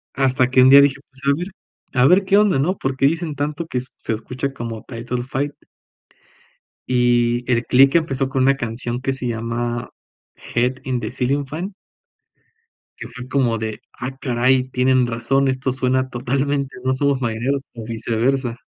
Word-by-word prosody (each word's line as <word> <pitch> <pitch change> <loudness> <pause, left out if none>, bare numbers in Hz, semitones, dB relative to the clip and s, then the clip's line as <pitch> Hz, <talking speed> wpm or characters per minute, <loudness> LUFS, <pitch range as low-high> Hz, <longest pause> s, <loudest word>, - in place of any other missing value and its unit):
Hasta 130 -2 +2
que 130 0 +5
un 130 - +7
día 140 +1 +10
dije: 135 -1 +2
"Pues, 130 +1 -10
a 140 +1 +3
ver 175 +2 -4 0.5
a 130 +1 +4
ver 185 +3 +5
qué 195 +2 +4
onda", 205 -10 +3
¿no?, 180 +7 +1
¿por 135 0 -2
qué 135 - +2
dicen 165 -1 -2
tanto 150 +3 -3
que 125 - -2
se 125 -3 -5
escucha 130 +5 -4
como 115 -4 -6
Title 120 0 -4
Fight? 140 +2 -3 1.4
Y 120 -1 +2
el 120 0 +1
click 135 +4 +5
empezó 135 -5 +1
con 130 -1 +1
una 135 +1 +4
canción 120 +1 -4
que 135 - 0
se 130 -2 -4
llama, 120 +1 -3 0.7
"Head 125 +2 +2
in 130 -2 -1
the - - -4
ceiling 140 +3 0
fan" 175 +8 -5 1.3
que - - -6
fue 125 0 -9
como 125 -4 +1
de: 110 -1 -4
"Ah 130 +2 -6
caray, 130 0 +1
tienen 130 0 +3
razón, 120 +4 0
esto 130 0 0
suena 130 0 0
totalmente 135 +3 -1
a - - -11
No 130 - +3
somos 140 -1 +1
marineros 120 +4 -1
o 115 - -7
viceversa". 120 +2 -1
130 Hz, 175 wpm, -20 LUFS, 120-140 Hz, 1.4 s, día